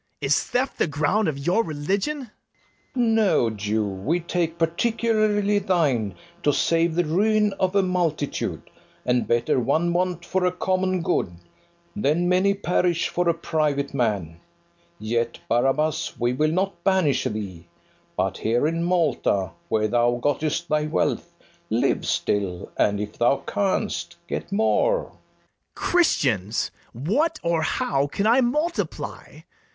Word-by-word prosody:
Is -, -, +2 dB
theft 255 Hz, +2 st, -1 dB
the -, -, +3 dB
ground 160 Hz, +8 st, +1 dB
of 150 Hz, -3 st, -1 dB
your 175 Hz, +11 st, +1 dB
religion? 200 Hz, -, -2 dB, 0.6 s
FERNEZE. -, -, -33 dB, 0.2 s
No, 200 Hz, -, +3 dB
Jew; 105 Hz, +1 st, -1 dB
we 100 Hz, -, -1 dB
take 170 Hz, -1 st, -2 dB
particularly 210 Hz, +3 st, +1 dB
thine, 140 Hz, -, +1 dB, 0.3 s
To 150 Hz, -, +3 dB
save 165 Hz, +2 st, +1 dB
the 175 Hz, 0 st, +2 dB
ruin 210 Hz, +5 st, +2 dB
of 185 Hz, +1 st, +1 dB
a 200 Hz, -, +4 dB
multitude: 170 Hz, -6 st, -2 dB, 0.4 s
And 125 Hz, -1 st, +1 dB
better 120 Hz, +2 st, +2 dB
one 165 Hz, +8 st, +1 dB
want 180 Hz, -1 st, -1 dB
for 190 Hz, -1 st, 0 dB
a 180 Hz, -, +3 dB
common 185 Hz, 0 st, 0 dB
good, 90 Hz, -, 0 dB, 0.6 s
Than 175 Hz, -3 st, +1 dB
many 185 Hz, +2 st, +3 dB
perish 180 Hz, -3 st, +1 dB
for 175 Hz, -1 st, 0 dB
a -, -, +4 dB
private 150 Hz, -4 st, -1 dB
man: 100 Hz, -, -1 dB, 0.6 s
Yet, 115 Hz, +2 st, -1 dB
Barabas, 135 Hz, +6 st, +1 dB
we 120 Hz, +1 st, +1 dB
will 155 Hz, +4 st, +1 dB
not 185 Hz, 0 st, -1 dB
banish 190 Hz, -7 st, +2 dB
thee, 95 Hz, -6 st, -5 dB, 0.5 s
But -, -, -1 dB
here 120 Hz, +5 st, +1 dB
in 165 Hz, +2 st, 0 dB
Malta, 150 Hz, -, +1 dB, 0.2 s
where 110 Hz, -1 st, +2 dB
thou 120 Hz, +2 st, +2 dB
gott'st 155 Hz, +5 st, -1 dB
thy 150 Hz, -1 st, +1 dB
wealth, 155 Hz, -, -1 dB, 0.4 s
Live -, -, +1 dB
still; 95 Hz, -4 st, -1 dB
and, 100 Hz, -1 st, +2 dB
if 105 Hz, 0 st, -6 dB
thou 135 Hz, +3 st, +2 dB
canst, 200 Hz, +1 st, -1 dB
get -, -, -4 dB
more. -, -, +2 dB
BARABAS. -, -, -17 dB, 0.6 s
Christians, 120 Hz, -, +1 dB, 0.2 s
what 215 Hz, -, 0 dB
or 170 Hz, -1 st, +1 dB
how 140 Hz, -3 st, 0 dB
can 200 Hz, +8 st, -2 dB
I 235 Hz, +4 st, +5 dB
multiply? 300 Hz, +8 st, -2 dB
165 Hz, 135 wpm, -24 LUFS, 125-190 Hz, 0.6 s, I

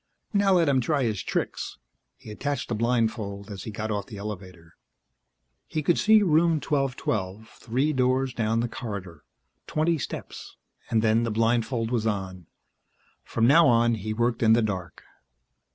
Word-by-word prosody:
Now 200 Hz, -1 st, +3 dB
let 170 Hz, -3 st, +4 dB
him 135 Hz, -2 st, +3 dB
try 140 Hz, +2 st, 0 dB
his 110 Hz, -5 st, -1 dB
tricks! -, -, -3 dB, 0.4 s
He 110 Hz, -, -11 dB
attached 140 Hz, +6 st, -3 dB
the -, -, -1 dB
blindfold 110 Hz, -3 st, -1 dB
as 95 Hz, -2 st, -7 dB
he -, -, -5 dB
got 110 Hz, +1 st, -4 dB
off 100 Hz, -1 st, -3 dB
the 105 Hz, -, -9 dB
elevator. 90 Hz, -5 st, -8 dB, 0.9 s
He 155 Hz, -, -3 dB
could 170 Hz, -, +2 dB
see 215 Hz, 0 st, +5 dB
Room 165 Hz, -1 st, +3 dB
1212, 110 Hz, -9 st, -2 dB
three 130 Hz, +8 st, -2 dB
doors 130 Hz, 0 st, +1 dB
down 115 Hz, 0 st, 0 dB
the 120 Hz, -, -1 dB
corridor, 100 Hz, -, -7 dB, 0.4 s
twenty 160 Hz, +1 st, +1 dB
steps -, -, -7 dB, 0.3 s
and 115 Hz, -1 st, +2 dB
then 110 Hz, +1 st, +3 dB
the 120 Hz, -, -1 dB
blindfold 115 Hz, +1 st, 0 dB
was 115 Hz, -2 st, 0 dB
on. 95 Hz, -4 st, -4 dB, 0.8 s
From 115 Hz, -, 0 dB
now 160 Hz, +7 st, +6 dB
on 120 Hz, 0 st, +4 dB
he 110 Hz, -1 st, -4 dB
worked 115 Hz, +1 st, 0 dB
in 110 Hz, -1 st, +5 dB
the 115 Hz, 0 st, +3 dB
dark. 90 Hz, -6 st, -4 dB
115 Hz, 160 wpm, -26 LUFS, 105-135 Hz, 0.9 s, now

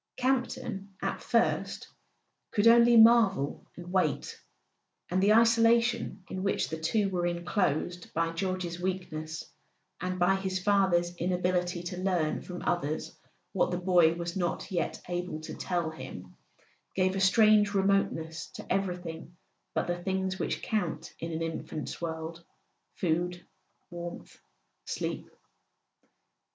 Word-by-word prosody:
Campton, 245 Hz, -6 st, -1 dB
at -, -, -2 dB
first, -, -, 0 dB, 0.6 s
could 205 Hz, 0 st, +1 dB
only 235 Hz, 0 st, +7 dB
marvel 220 Hz, -10 st, +5 dB
and 175 Hz, -, -9 dB
w 185 Hz, -5 st, +4 dB
r -, -, -4 dB
ait; -, -, -10 dB, 0.7 s
and 185 Hz, +1 st, +2 dB
the 200 Hz, +2 st, +4 dB
isolation 230 Hz, -2 st, +3 dB
in 185 Hz, -, -5 dB
which 195 Hz, 0 st, 0 dB
the 160 Hz, -, -4 dB
two 195 Hz, +6 st, +1 dB
were 175 Hz, -1 st, 0 dB
enclosed 175 Hz, -1 st, -1 dB
by 165 Hz, 0 st, 0 dB
George's 180 Hz, 0 st, -3 dB
weakness, 160 Hz, -4 st, -3 dB, 0.6 s
and 185 Hz, +1 st, -2 dB
by 180 Hz, +2 st, +3 dB
his 190 Hz, -1 st, -2 dB
father's 185 Hz, -3 st, +2 dB
inability 180 Hz, 0 st, 0 dB
to 180 Hz, +1 st, -5 dB
learn 180 Hz, -5 st, 0 dB
from 180 Hz, -1 st, -7 dB
others 155 Hz, -3 st, -1 dB, 0.4 s
what 190 Hz, -, +2 dB
the 175 Hz, -, -1 dB
boy 175 Hz, -2 st, +4 dB
was 170 Hz, 0 st, -4 dB
not 175 Hz, 0 st, -2 dB
yet 175 Hz, -4 st, -1 dB
able 175 Hz, -2 st, -3 dB
to 155 Hz, -, -7 dB
tell 170 Hz, -3 st, -2 dB
him, 90 Hz, -, -9 dB, 0.6 s
gave 185 Hz, 0 st, +2 dB
a -, -, -1 dB
strange 210 Hz, +1 st, +5 dB
remoteness 190 Hz, -5 st, +1 dB
to -, -, -10 dB
everything 175 Hz, -3 st, -4 dB, 0.4 s
but -, -, +1 dB
the 175 Hz, 0 st, -3 dB
things 190 Hz, +1 st, -1 dB
which -, -, -2 dB
count 205 Hz, -7 st, -2 dB
in 165 Hz, +1 st, -4 dB
an 165 Hz, 0 st, -2 dB
infant's 160 Hz, -1 st, -5 dB
world: 165 Hz, 0 st, -5 dB, 0.5 s
food, 175 Hz, +1 st, -1 dB, 0.5 s
warmth, 175 Hz, 0 st, -8 dB, 0.4 s
sleep. -, -, -4 dB
180 Hz, 135 wpm, -29 LUFS, 170-195 Hz, 0.7 s, only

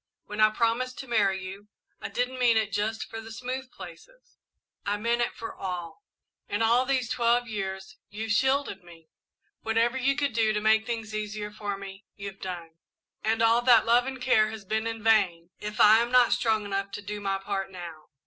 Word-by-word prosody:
When 210 Hz, +1 st, -4 dB
I 215 Hz, -, +7 dB
promised 235 Hz, +3 st, 0 dB
to 265 Hz, -, -7 dB
marry 200 Hz, -5 st, +2 dB
you, 195 Hz, +2 st, -9 dB, 0.3 s
I -, -, -4 dB
didn't 250 Hz, +1 st, -2 dB
mean 240 Hz, -2 st, +4 dB
it 220 Hz, -1 st, 0 dB
just 215 Hz, +2 st, -1 dB
for 225 Hz, -, -7 dB
the 225 Hz, 0 st, -10 dB
smooth 255 Hz, +3 st, -5 dB
places, -, -, -13 dB, 0.4 s
I 205 Hz, +1 st, -1 dB
meant 235 Hz, +3 st, 0 dB
it 240 Hz, -, -1 dB
for 230 Hz, -, -7 dB
all. 180 Hz, -, -6 dB, 0.5 s
In 205 Hz, +2 st, 0 dB
all 240 Hz, +3 st, +3 dB
these 260 Hz, -3 st, +1 dB
twelve 240 Hz, +1 st, +2 dB
years 190 Hz, -3 st, -5 dB
you've 220 Hz, +1 st, -4 dB
shielded 265 Hz, -4 st, +1 dB
me 165 Hz, -2 st, -16 dB, 0.5 s
whatever 230 Hz, +3 st, +1 dB
you 275 Hz, +2 st, +2 dB
could 285 Hz, -4 st, -1 dB
do 220 Hz, -1 st, +2 dB
to 210 Hz, -, 0 dB
make 220 Hz, +1 st, +3 dB
things 225 Hz, -2 st, -4 dB
easier 210 Hz, 0 st, -4 dB
for 205 Hz, -1 st, -4 dB
me, 195 Hz, +1 st, -10 dB
you've 200 Hz, -1 st, -8 dB
done, 170 Hz, -3 st, -7 dB, 0.4 s
and 225 Hz, +1 st, +1 dB
all 230 Hz, +1 st, +4 dB
that 240 Hz, -3 st, +6 dB
love 240 Hz, +2 st, +4 dB
and 265 Hz, -1 st, -5 dB
care 220 Hz, -4 st, +3 dB
has 220 Hz, -2 st, -8 dB
been 220 Hz, +3 st, -1 dB
in 225 Hz, -1 st, -5 dB
vain 180 Hz, -6 st, +2 dB
if 210 Hz, 0 st, -6 dB
I 215 Hz, +1 st, +8 dB
am 235 Hz, +1 st, -1 dB
not 250 Hz, -1 st, +5 dB
strong 220 Hz, -2 st, +1 dB
enough 195 Hz, 0 st, -2 dB
to 205 Hz, -, -6 dB
do 205 Hz, +1 st, -5 dB
my 195 Hz, -1 st, 0 dB
part 195 Hz, 0 st, -3 dB
now. 170 Hz, -4 st, -9 dB
220 Hz, 200 wpm, -27 LUFS, 200-235 Hz, 0.5 s, I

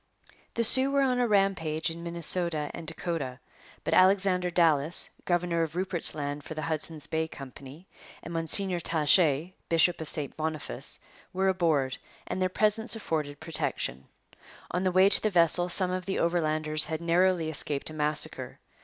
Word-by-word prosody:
The 235 Hz, -, +1 dB
Sioux 260 Hz, +4 st, +7 dB
were 280 Hz, 0 st, +2 dB
on 250 Hz, -2 st, +1 dB
a 245 Hz, -, +2 dB
rampage 185 Hz, -7 st, 0 dB
in 165 Hz, +1 st, -8 dB
Minnesota 170 Hz, -2 st, -3 dB
and 165 Hz, -, -8 dB
Dakota, 160 Hz, -6 st, -4 dB, 0.4 s
but -, -, -2 dB
Alexander 185 Hz, -1 st, +4 dB
Dallas, 165 Hz, -2 st, +1 dB
governor 175 Hz, -1 st, 0 dB
of 165 Hz, 0 st, -3 dB
Rupert's 180 Hz, -4 st, 0 dB
Land 145 Hz, -1 st, -4 dB
for 160 Hz, -, -8 dB
the 155 Hz, -, -4 dB
Hudson's 155 Hz, -1 st, 0 dB
Bay 160 Hz, 0 st, -2 dB
Company, 135 Hz, +3 st, -11 dB, 0.4 s
and 170 Hz, -, -8 dB
Mgr 175 Hz, +2 st, 0 dB
Taché, 160 Hz, +1 st, +2 dB, 0.2 s
bishop 165 Hz, +1 st, +3 dB
of 160 Hz, -, -6 dB
St 145 Hz, -3 st, -3 dB
Boniface, 155 Hz, -, -4 dB, 0.4 s
were 190 Hz, +1 st, +1 dB
aboard, 160 Hz, -8 st, 0 dB, 0.3 s
and 185 Hz, -, -4 dB
their 185 Hz, -, +1 dB
presence 215 Hz, +4 st, +1 dB
afforded 150 Hz, -9 st, -4 dB
protection. 150 Hz, -, -3 dB, 0.6 s
On 180 Hz, -, -1 dB
the 185 Hz, -1 st, +1 dB
way 185 Hz, +2 st, +5 dB
to 200 Hz, -, +4 dB
the 215 Hz, -, +1 dB
vessel 175 Hz, -1 st, +2 dB
some 180 Hz, 0 st, +2 dB
of 185 Hz, 0 st, -4 dB
the 190 Hz, -, -2 dB
Overlanders 155 Hz, -3 st, 0 dB
had 160 Hz, -1 st, -4 dB
narrowly 170 Hz, -1 st, +1 dB
escaped 145 Hz, 0 st, -1 dB
a -, -, -9 dB
massacre. 150 Hz, 0 st, 0 dB
165 Hz, 160 wpm, -28 LUFS, 155-185 Hz, 0.6 s, Sioux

